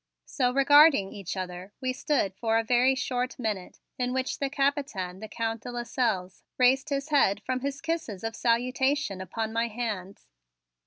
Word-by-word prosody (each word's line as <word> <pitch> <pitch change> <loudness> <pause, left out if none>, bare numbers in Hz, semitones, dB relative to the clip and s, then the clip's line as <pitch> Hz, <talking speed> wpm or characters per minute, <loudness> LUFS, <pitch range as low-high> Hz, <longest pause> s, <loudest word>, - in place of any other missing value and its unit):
So 250 -3 0
regarding 275 -5 +6
each 195 -1 -6
other, 185 +1 -6
we 255 -1 -1
stood 255 -7 0
for 225 +3 0
a 225 - +2
very 250 +3 +3
short 255 0 -2
minute 215 -7 -4 0.2
in 250 0 0
which 260 0 -2
the 275 - -1
Capitaine, 275 - -1
the 220 - -7
Count 225 0 -3
de - - -7
Lasselles, 230 -6 -2 0.2
raised 260 +1 +3
his 280 +1 -2
head 215 -9 +3
from 255 0 -1
his 275 +1 -4
kisses 320 - -3
of 225 0 -3
salutation 250 -2 +1
upon 220 +4 -4
my 230 +1 +1
hands. 210 -5 -5
245 Hz, 165 wpm, -28 LUFS, 205-270 Hz, 0.2 s, regarding